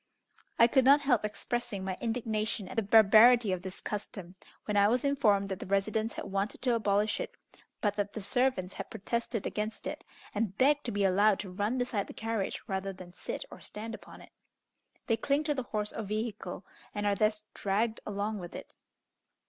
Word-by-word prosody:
I 230 - +8
could 260 +3 +4
not 280 +3 +7
help 255 -6 +2
expressing 215 -1 -3
my 190 -1 -2
indignation 220 -3 -1
at - - -8
the 225 - +2
barbarity 220 +2 +7
of 185 -1 -1
this 190 0 -7
custom, 195 -3 -6 0.3
when 210 - -2
I 200 0 +6
was 245 +5 +1
informed 210 -8 +3
that 190 -2 -3
the - - -7
residents 215 +3 0
had - - -5
wanted 195 +2 -3
to 250 -2 +3
abolish 210 -2 +1
it, - - -5 0.5
but 205 -2 +1
that 205 0 -1
the - - -4
servants 245 -4 +1
had 195 - -6
protested 230 +1 -3
against 215 +1 -3
it, - - -5 0.3
and 205 -2 -2
begged 290 +2 +3
to 240 - -1
be 205 -1 0
allowed 200 +2 +4
to 195 -3 -8
run 205 +6 -1
beside 245 -5 -1
the - - -9
carriage 225 -3 -2
rather 190 0 -2
than 185 -2 -11
sit - - -5
or - - -10
stand 225 +2 -7
upon - - -11
it. - - -15 0.7
They 225 - +1
cling 280 +6 +1
to 300 -1 +1
the 270 - -2
horse 210 -1 -2
or - - -4
vehicle, 210 -3 -4 0.3
and 205 0 -2
are 205 - +3
thus 215 +1 +1
dragged 215 +3 0
along 210 +1 -3
with 175 -2 -8
it. - - -9
215 Hz, 195 wpm, -31 LUFS, 200-230 Hz, 0.7 s, I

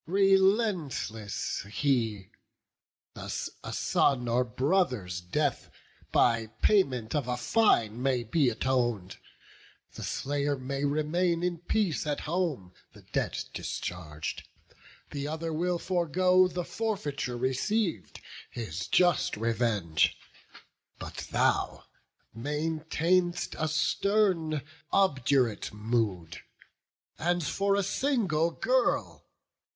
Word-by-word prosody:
Relentless 190 - +1
he! 115 -7 0 0.8
a - - -7 0.4
son's 125 -4 +1
or 120 +2 +2
brother's 125 - 0
death, 135 +11 -1 0.4
By 115 -2 +3 0.2
payment 130 - +2
of 145 -5 0
a 125 0 -1
fine, 120 - +2
may 130 -2 +1
be 130 +4 +2
aton'd; 120 -5 -1 0.8
The - - -9
slayer 145 0 -1
may 135 +2 -3
remain 165 +4 +1
in 175 -2 -1
peace 175 -3 0
at 145 - -1
home, 150 - -2 0.2
The - - -16
debt - - -2
discharg'd; 80 -4 -5 0.7
the 140 0 -3
other 160 +1 -3
will 175 +3 0
forego, 180 +1 +3
The 180 -1 -4
forfeiture 150 - -3
receiv'd, 135 - -1 0.3
his 95 -6 -5
just 175 -9 +3
revenge; 110 -8 +1 0.8
But - - -7
thou - - +1 0.5
maintain'st 160 +6 0
a 155 - +1
stern, 165 -1 +1 0.3
obdurate 135 - +2
mood. 105 -6 -2 0.8
And 175 +1 +1
for 200 +6 +1
a 200 - +1
single 195 - +1
girl! - - 0
145 Hz, 95 wpm, -29 LUFS, 120-180 Hz, 0.8 s, By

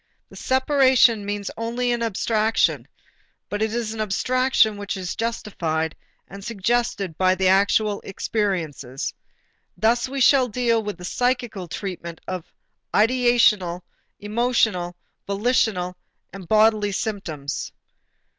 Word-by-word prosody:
The - - -14
separation 260 -5 +3
means 205 -1 -3
only 240 +2 -1
an 240 -1 -1
abstraction, 220 0 +1 0.6
but 205 +1 -3
it 220 0 +1
is 230 -1 -2
an 220 - -4
abstraction 225 +1 +2
which 200 0 -4
is 185 -2 -4
justified 170 -9 -2 0.3
and 195 +1 -10
suggested 225 -4 -1
by 185 0 +4
the 190 0 +1
actual 200 +2 +2
experiences. 170 - -3 0.6
Thus 235 +3 +2
we 275 +1 -4
shall 260 0 +5
deal 235 0 +1
with 210 -3 -5
the 180 - -8
psychical 240 -4 -1
treatment 170 -2 -6
of 185 -3 -5 0.4
ideational, 220 -6 +3 0.4
emotional, 210 -5 0 0.3
volitional, 200 -3 +1 0.4
and 195 -3 -9
bodily 215 0 +3
symptoms. 165 -10 -4
210 Hz, 115 wpm, -23 LUFS, 185-235 Hz, 0.6 s, shall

